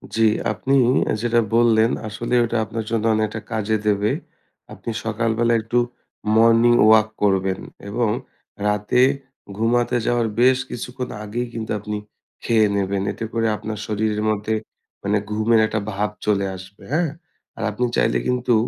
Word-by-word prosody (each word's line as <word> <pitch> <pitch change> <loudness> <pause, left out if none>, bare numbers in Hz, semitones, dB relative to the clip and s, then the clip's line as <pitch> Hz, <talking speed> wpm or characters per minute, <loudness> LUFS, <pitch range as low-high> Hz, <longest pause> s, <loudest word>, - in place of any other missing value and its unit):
জি। 115 - +1 0.3
আপনি 120 +6 0 0.4
আ - - +1
যেটা 120 0 +2 0.2
বললেন 115 -1 +4 0.2
আসলে 115 +3 -4
ওইটা 120 0 -1
আপনার 110 +1 -5
জন্য 115 -2 0
অনেকটা 110 0 -1
কাজে 110 0 0
দেবে। 105 0 +2 0.6
আপনি - - -7 0.2
সকালবেলা 115 +1 +1
একটু 115 +2 -2 0.6
morning 115 +1 +5
walk 110 0 +6 0.2
করবেন 95 -1 +1 0.3
এবং 115 +1 0 0.6
রাতে 105 +4 +2 0.6
ঘুমাতে 120 +2 +1
যাওয়ার 120 -1 +1
বেশ 130 +1 +5
কিছুক্ষণ 125 +1 -5
আগেই 120 +4 -3
কিন্তু 110 -1 -5
আপনি 105 0 -5 0.5
খেয়ে 110 -2 +3
নেবেন। 100 -1 0
এতে 115 - -5
করে 115 -1 +1
আপনার 110 0 -5
শরীরের 105 0 -1
মধ্যে 110 +1 -1 0.5
মানে 100 +1 +1
ঘুমের 110 +2 +3
একটা 110 - -1
ভাব 105 +1 -1 0.2
চলে 100 -2 +2
আসবে, 95 +2 -13
হ্যাঁ? 160 0 +2 0.5
আর - - -4
আপনি 125 +4 -1
চাইলে - - +2
কিন্তু 125 -1 +1
110 Hz, 145 wpm, -22 LUFS, 105-120 Hz, 0.6 s, walk